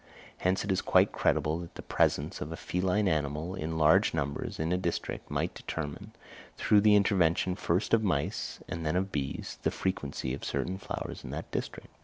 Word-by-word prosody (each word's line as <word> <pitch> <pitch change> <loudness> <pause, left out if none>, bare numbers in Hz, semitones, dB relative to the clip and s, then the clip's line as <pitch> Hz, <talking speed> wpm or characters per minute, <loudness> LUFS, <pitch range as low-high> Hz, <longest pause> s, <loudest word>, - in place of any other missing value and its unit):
Hence 95 +1 +1
it 100 - -1
is 95 - +2
quite - - +4
credible 80 +2 +1
that 85 -1 -9
the - - -7
presence 75 +6 +1
of 75 - -4
a 85 - -5
feline 95 +3 0
animal 75 +1 -1
in 80 -3 -3
large 80 0 +5
numbers 70 0 -3
in 80 +2 0
a - - +3
district 85 -2 -3
might - - -1
determine, 75 -3 -5 0.4
through 105 -1 +4
the 105 0 +6
intervention 95 -3 +3
first 90 +5 0
of 110 -1 +5
mice 80 -8 -1
and 80 +1 -4
then 80 +1 0
of 95 +1 0
bees, 70 -2 -3
the - - +2
frequency 70 -8 -2
of 70 - -6
certain 95 +1 -2
flowers - - -5
in - - -7
that - - -6
district! - - -5
85 Hz, 190 wpm, -30 LUFS, 75-95 Hz, 0.4 s, the